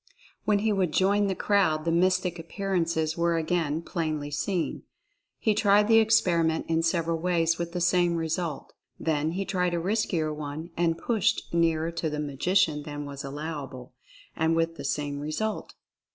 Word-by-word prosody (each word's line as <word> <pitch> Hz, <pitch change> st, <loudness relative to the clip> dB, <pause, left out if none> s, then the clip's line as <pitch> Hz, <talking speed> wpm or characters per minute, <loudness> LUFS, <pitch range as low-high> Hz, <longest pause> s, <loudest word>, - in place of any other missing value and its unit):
When 210 Hz, -1 st, +3 dB
he 215 Hz, +1 st, +1 dB
would 185 Hz, -5 st, 0 dB
join 200 Hz, +2 st, +3 dB
the 190 Hz, -, -1 dB
crowd 180 Hz, -8 st, +1 dB
the 165 Hz, -, +1 dB
mystic 180 Hz, 0 st, +1 dB
appearances 165 Hz, -3 st, -1 dB
were 170 Hz, 0 st, +1 dB
again 165 Hz, -1 st, -1 dB
plainly 155 Hz, -4 st, -3 dB
seen. 175 Hz, +4 st, -2 dB, 0.6 s
He 215 Hz, -, +1 dB
tried 210 Hz, 0 st, +4 dB
the 225 Hz, 0 st, +6 dB
experiment 170 Hz, -7 st, +2 dB
in 165 Hz, 0 st, +1 dB
several 165 Hz, 0 st, 0 dB
ways, 165 Hz, -1 st, +1 dB
with 170 Hz, 0 st, -4 dB
the 180 Hz, -, -2 dB
same 175 Hz, 0 st, +3 dB
result. 165 Hz, -2 st, -3 dB, 0.3 s
Then 155 Hz, 0 st, 0 dB
he 195 Hz, +2 st, -2 dB
tried 180 Hz, -3 st, 0 dB
a -, -, 0 dB
riskier 175 Hz, -5 st, 0 dB
one 150 Hz, +3 st, -6 dB
and 165 Hz, -1 st, +1 dB
pushed 220 Hz, -5 st, 0 dB
nearer 165 Hz, -1 st, +2 dB
to 170 Hz, -1 st, -2 dB
the 150 Hz, 0 st, -4 dB
magician 150 Hz, +2 st, +1 dB
than 145 Hz, 0 st, -6 dB
was 140 Hz, -1 st, -7 dB
allowable 140 Hz, -3 st, -6 dB, 0.2 s
— -, -, -24 dB
and 160 Hz, +1 st, +1 dB
with 165 Hz, 0 st, 0 dB
the -, -, -7 dB
same 145 Hz, -1 st, -2 dB
result. 155 Hz, +9 st, -3 dB
165 Hz, 165 wpm, -27 LUFS, 155-185 Hz, 0.6 s, the